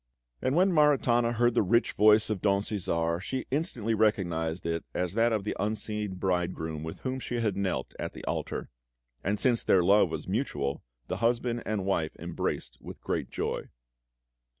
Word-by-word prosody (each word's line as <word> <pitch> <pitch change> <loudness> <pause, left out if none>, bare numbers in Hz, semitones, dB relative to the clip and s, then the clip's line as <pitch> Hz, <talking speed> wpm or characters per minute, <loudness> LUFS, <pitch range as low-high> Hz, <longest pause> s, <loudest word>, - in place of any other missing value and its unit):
And 130 - +1
when 185 +3 +4
Maritana 125 -6 +4
heard 120 +1 +3
the - - +3
rich 115 +5 +2
voice 110 +1 +5
of 100 -4 -2
Don 100 -1 +2
Cæsar 85 -5 -1
she 130 +7 -3
instantly 125 - -1
recognised 85 -7 0
it 85 0 -1
as 90 0 -1
that 115 +2 +3
of 110 -3 0
the 105 - -3
unseen 105 -1 -2
bridegroom 90 -4 -1
with 80 +1 -7
whom 130 0 -2
she 125 - -4
had 110 -5 0
knelt 95 -9 -2
at - - -4
the - - -9
altar; - - -3 0.5
and 100 +2 0
since 120 -3 +3
their 90 - +4
love 100 0 +5
was 80 +1 -5
mutual, 75 - -1 0.2
the - - -3
husband 120 0 +1
and 105 -3 -1
wife 80 -5 0
embraced 85 -1 -4
with - - -9
great - - -2
joy. - - -3
105 Hz, 175 wpm, -29 LUFS, 90-120 Hz, 0.5 s, voice